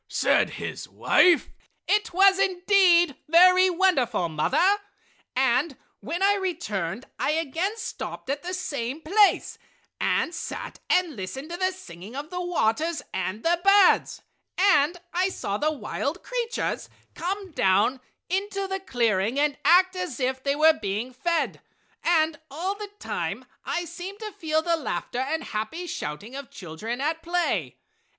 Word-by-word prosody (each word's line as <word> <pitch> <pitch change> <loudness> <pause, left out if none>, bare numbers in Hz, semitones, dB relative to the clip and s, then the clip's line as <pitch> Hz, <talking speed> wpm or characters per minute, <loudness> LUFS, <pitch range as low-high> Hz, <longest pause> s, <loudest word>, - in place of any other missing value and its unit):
said - - +2
his - - -6
wife. 350 -3 +4 0.4
"It 420 +2 +1
was 385 +2 +5
indeed 365 -4 +4
very 365 +3 +6
wonderful, 340 - +1
mother. 300 - +2 0.6
And 260 +3 +1 0.2
when 345 +6 -3
I 400 +1 +5
returned 255 - -3
I 300 - +1
again 330 +7 -1
stopped 465 - -6
at 275 +2 -2
the 360 +1 -4
same 280 -5 -4
place 400 +6 +3 0.4
and 340 - +1
sat - - -6
and 355 -5 +2
listened 265 - -6
to 345 - -4
the 370 +1 +1
singing 200 - -11
of 295 +4 -6
the 360 0 -3
waters 330 -2 0
and 190 +3 -3
the 345 +1 +2
birds, 395 -1 +4 0.3
and 355 -3 +3
I 365 +2 +2
saw 205 - -3
the 305 +1 +1
wild 305 +3 -4
creatures 480 -2 -3 0.2
come 385 +2 -4
down 205 +2 +2 0.3
into 395 +1 -2
the 385 0 -3
clearing 235 - 0
and 295 -1 +2
act 370 +4 +5
as 360 -9 -4
if 260 0 -1
they 280 +1 0
were 315 +2 +6
being 215 +5 -3
fed, 335 +5 -1 0.4
and 320 -2 +2
all 340 +8 -2
the 410 0 -8
time - - -4 0.2
I 350 - -2
seemed 355 +4 -7
to 430 -1 -5
feel 315 -5 -1
the 335 -1 +1
laughter 255 -4 -4
and 315 +5 -1
happy 220 +12 -4
shouting 205 - -6
of 280 -2 -7
children 210 +8 -6
at 320 +3 -1
play. 320 - -1
325 Hz, 145 wpm, -25 LUFS, 260-370 Hz, 0.6 s, very